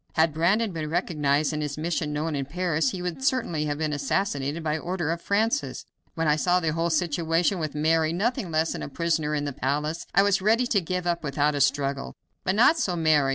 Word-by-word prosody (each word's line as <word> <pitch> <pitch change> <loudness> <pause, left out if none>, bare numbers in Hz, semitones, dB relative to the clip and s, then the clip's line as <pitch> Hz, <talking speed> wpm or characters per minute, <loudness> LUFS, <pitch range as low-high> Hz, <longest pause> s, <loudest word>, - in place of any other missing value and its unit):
Had 160 -1 +3
Brandon 195 +8 +2
been 155 -3 -4
recognized 155 -3 0
and 150 - -2
his 150 -1 -3
mission 160 -1 -2
known 150 +1 -2
in 140 -1 -2
Paris, 160 -1 0
he 180 +3 -5
would 180 +9 -4
certainly 175 - 0
have 145 -1 -2
been 155 -1 -1
assassinated 145 0 -1
by 155 -1 0
order 170 0 -2
of 170 0 -3
Francis. 225 +7 0 0.3
When 165 -1 0
I 150 0 +3
saw 180 +3 +2
the 160 -3 -1
whole 165 +1 0
situation, 165 +2 +1
with 155 -2 -4
Mary 160 +1 +2
nothing 215 +3 -1
less 160 0 +1
than - - -6
a - - -5
prisoner 160 -1 0
in 145 -1 -1
the 145 - -3
palace, 150 +6 -2
I 195 - +6
was 200 -1 +2
ready 225 +5 +3
to 210 -5 +1
give 180 +1 -3
up 170 -1 -1
without 145 +1 +1
a 145 - -1
struggle, 140 0 0 0.3
but 185 - 0
not 265 +9 +5
so 185 - 0
Mary. 155 -4 +3
160 Hz, 220 wpm, -26 LUFS, 150-180 Hz, 0.3 s, I